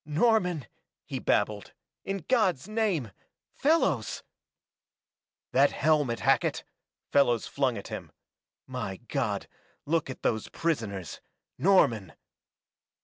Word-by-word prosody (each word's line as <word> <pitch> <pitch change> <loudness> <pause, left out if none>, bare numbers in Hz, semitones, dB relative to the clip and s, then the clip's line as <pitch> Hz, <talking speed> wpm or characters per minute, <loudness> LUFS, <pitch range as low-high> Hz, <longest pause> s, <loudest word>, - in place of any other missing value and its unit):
"Norman!" 180 - +2 0.4
he - - -4
babbled. 105 -1 0 0.3
"In 195 -4 -4
God's 190 - +2
name 210 - 0 0.4
Fellows 190 - +1 0.7
!" - - -66
"That 140 +2 +5
helmet, 145 -5 +2
Hackett!" - - +2 0.5
Fellows 120 -5 +3
flung 130 -5 0
at 100 - -8
him. - - -6 0.5
"My 125 -7 -4
God, - - -2 0.4
look 160 -1 0
at 130 - -8
those 110 -2 0
prisoners 110 - -3 0.4
Norman!" 120 - +3
140 Hz, 100 wpm, -28 LUFS, 115-180 Hz, 0.7 s, That